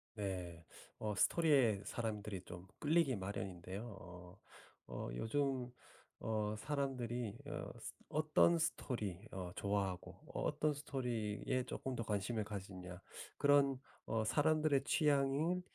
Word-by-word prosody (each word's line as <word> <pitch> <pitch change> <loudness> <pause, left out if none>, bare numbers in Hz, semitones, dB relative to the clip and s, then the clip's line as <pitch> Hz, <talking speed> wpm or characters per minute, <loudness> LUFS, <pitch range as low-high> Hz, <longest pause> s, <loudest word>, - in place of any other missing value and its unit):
네. 90 -5 -4 0.3
어 105 -1 -1
스토리에 135 - +4
사람들이 105 -4 -3
좀 90 +1 -9
끌리기 155 -3 +4
마련인데요. 95 0 -4 0.2
어 90 +1 -11 0.5
어 - - -4
요즘 130 - 0 0.5
어 110 -1 0
사람들이 125 -4 -1
어 150 0 -4
스 - - -6 0.2
어떤 155 +2 +5
스토리 115 - -1
어 90 -2 -4
좋아하고 100 -3 -1 0.2
어 - - -2
어떤 150 -1 +2
스토리에 125 -4 -1
쪼끔 130 0 -3
더 115 - -1
관심을 105 +1 0
가지느냐. 95 -3 -6 0.4
그런 140 -2 +5 0.3
어 110 0 +1
사람들의 150 +1 +4
취향이 145 +4 +3
115 Hz, 255 characters per minute, -38 LUFS, 100-140 Hz, 0.5 s, 어떤